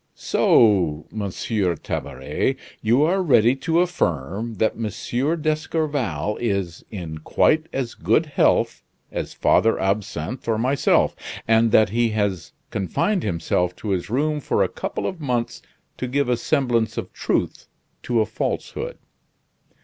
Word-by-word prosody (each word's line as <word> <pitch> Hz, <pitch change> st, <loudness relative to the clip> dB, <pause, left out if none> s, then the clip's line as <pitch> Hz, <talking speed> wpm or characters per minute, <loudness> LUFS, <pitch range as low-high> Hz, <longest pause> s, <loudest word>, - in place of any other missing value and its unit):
"So, 90 Hz, -9 st, +3 dB
Monsieur 100 Hz, -2 st, -1 dB
Tabaret, -, -, -2 dB, 0.3 s
you 120 Hz, +6 st, +3 dB
are 185 Hz, +5 st, +2 dB
ready 125 Hz, -7 st, +4 dB
to 165 Hz, +5 st, +2 dB
affirm 110 Hz, -, -1 dB
that 110 Hz, +3 st, +1 dB
M. 120 Hz, -, -2 dB
d'Escorval 150 Hz, -, -1 dB
is 100 Hz, -7 st, -2 dB
in 85 Hz, -7 st, -6 dB
quite 155 Hz, -, +2 dB
as 130 Hz, -3 st, -3 dB
good 165 Hz, -, +2 dB
health 150 Hz, -, +2 dB, 0.3 s
as -, -, -4 dB
Father 115 Hz, -, +3 dB
Absinthe 100 Hz, -, -2 dB
or 115 Hz, -1 st, +1 dB
myself; 130 Hz, +4 st, +2 dB, 0.3 s
and 110 Hz, 0 st, +4 dB
that 110 Hz, -2 st, +5 dB
he 115 Hz, +3 st, +1 dB
has 95 Hz, -6 st, -1 dB, 0.2 s
confined 170 Hz, -, 0 dB
himself 90 Hz, -, -1 dB
to 105 Hz, -, -6 dB
his 95 Hz, -1 st, -1 dB
room 150 Hz, +5 st, 0 dB
for -, -, +1 dB
a -, -, +1 dB
couple -, -, -4 dB
of 180 Hz, -3 st, -4 dB
months 125 Hz, -4 st, -2 dB, 0.4 s
to 130 Hz, -, -3 dB
give 140 Hz, +1 st, 0 dB
a 125 Hz, -, +3 dB
semblance 120 Hz, -4 st, 0 dB
of -, -, -5 dB
truth -, -, -2 dB, 0.3 s
to 120 Hz, -2 st, +1 dB
a -, -, +2 dB
falsehood?" 110 Hz, -, -4 dB
115 Hz, 135 wpm, -23 LUFS, 100-140 Hz, 0.4 s, that